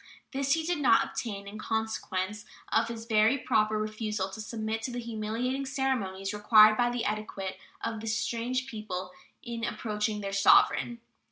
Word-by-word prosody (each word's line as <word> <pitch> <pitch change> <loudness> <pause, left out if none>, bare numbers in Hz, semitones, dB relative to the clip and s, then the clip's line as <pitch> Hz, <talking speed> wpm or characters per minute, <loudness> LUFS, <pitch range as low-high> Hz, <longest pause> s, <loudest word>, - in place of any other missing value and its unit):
This 275 0 +1
he 325 0 0
did 345 -2 0
not 245 -5 +5
obtain, 200 -4 -5
in 210 +2 -8
consequence 210 -3 -2 0.3
of 225 +1 +3
his 230 -1 -6
very 220 +3 +4
proper 215 -4 +1
refusal 215 -2 -2
to 220 - -7
submit 220 0 -3
to 250 - -4
the 245 - -5
humiliating 235 +3 -2
ceremonies 230 -9 -1
required 215 +1 +7
by 240 +1 +2
the 240 -1 -2
etiquette 195 -3 -3 0.2
of 225 - -2
this 225 0 -1
strange 245 +3 -1
people 190 -6 -5 0.3
in 235 -1 -5
approaching 210 -2 -2
their 195 -1 -4
sovereign. 230 +4 +4
220 Hz, 160 wpm, -29 LUFS, 210-235 Hz, 0.3 s, required